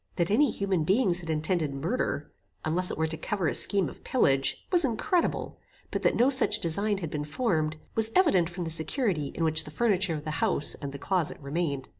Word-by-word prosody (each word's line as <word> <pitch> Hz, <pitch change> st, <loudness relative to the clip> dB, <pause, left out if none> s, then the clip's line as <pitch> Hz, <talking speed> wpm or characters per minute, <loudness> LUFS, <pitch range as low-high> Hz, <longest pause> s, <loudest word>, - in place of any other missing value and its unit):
That 175 Hz, +1 st, 0 dB
any 280 Hz, +6 st, +4 dB
human 195 Hz, -6 st, -1 dB
beings 190 Hz, 0 st, +2 dB
had 165 Hz, -2 st, -9 dB
intended 155 Hz, -2 st, -1 dB
murder, 170 Hz, -, -3 dB, 0.3 s
unless 180 Hz, +3 st, +1 dB
it -, -, -5 dB
were 160 Hz, -, +1 dB
to 160 Hz, 0 st, -4 dB
cover 190 Hz, +1 st, -2 dB
a 135 Hz, -, 0 dB
scheme 195 Hz, +8 st, +2 dB
of -, -, -11 dB
pillage, 135 Hz, -, +1 dB
was 350 Hz, -2 st, +4 dB
incredible; 295 Hz, -, -1 dB, 0.3 s
but -, -, -2 dB
that -, -, +2 dB
no 250 Hz, +4 st, +3 dB
such 255 Hz, -5 st, +3 dB
design 200 Hz, +5 st, 0 dB
had 165 Hz, -5 st, -6 dB
been 150 Hz, -1 st, -3 dB
formed, 155 Hz, -, -1 dB, 0.2 s
was 220 Hz, 0 st, +6 dB
evident 190 Hz, -, +3 dB
from 175 Hz, 0 st, -6 dB
the 165 Hz, -, -1 dB
security 160 Hz, -, -1 dB
in 165 Hz, -, -2 dB
which 160 Hz, 0 st, +3 dB
the -, -, -10 dB
furniture 190 Hz, -1 st, 0 dB
of 150 Hz, -, -6 dB
the 155 Hz, -, -4 dB
house 145 Hz, -, +4 dB
and 140 Hz, -1 st, -7 dB
the 140 Hz, -, -7 dB
closet 175 Hz, +2 st, 0 dB
remained. 140 Hz, -2 st, -3 dB
175 Hz, 210 wpm, -27 LUFS, 155-210 Hz, 0.3 s, was